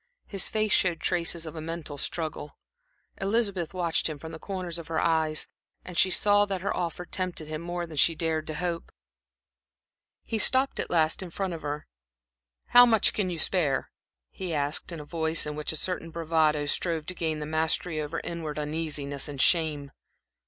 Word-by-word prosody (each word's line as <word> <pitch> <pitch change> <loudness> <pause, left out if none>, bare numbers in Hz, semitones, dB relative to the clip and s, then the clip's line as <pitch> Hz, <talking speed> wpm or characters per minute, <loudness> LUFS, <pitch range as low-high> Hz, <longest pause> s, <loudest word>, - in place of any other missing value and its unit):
His 195 -3 +3
face 215 -1 0
showed 175 -3 +2
traces 170 -1 0
of 160 - -7
a 160 - -5
mental 160 -3 -5
struggle. 155 -2 -3 0.6
Elizabeth 195 -4 0
watched 170 -3 0
him 155 - -5
from 160 +3 -8
the 160 - -8
corners 180 -3 -4
of 165 - -9
her 165 - -1
eyes; 160 -2 +1 0.5
she 185 - +4
saw 205 +2 +4
that 195 -3 -3
her 200 - -1
offer 175 0 -3
tempted 180 -4 -3
him 155 0 -4
more 175 0 -3
than 160 -3 -10
she 165 +4 +5
had - - -16
dared 160 -2 -1
to 155 - -4
hope. 170 0 -3 1.3
He 225 - -2
stopped 265 +5 +5
at - - -2
last 160 -1 +2
in 185 - -6
front 190 +1 -3
of 165 - -6
her. 145 0 -4 0.8
"How 245 - +9
much 225 -3 +4
can 200 -3 0
you 175 - -3
spare?" 160 -5 +1 0.4
he 180 -4 -4
asked, 145 +4 -1
in 170 - -6
a 150 - -8
voice 160 +1 0
in 150 0 -4
which 150 0 -2
a - - -4
certain 165 +1 -2
bravado 160 -2 +1
strove 160 +1 -1
to 185 - -2
gain 160 -3 -1
the 150 - -4
mastery 160 +1 0
over 150 +2 -3
inward 160 -3 -4
uneasiness 150 -2 -3
and 145 -2 -7
shame. 150 -3 +2
165 Hz, 190 wpm, -28 LUFS, 155-180 Hz, 1.3 s, How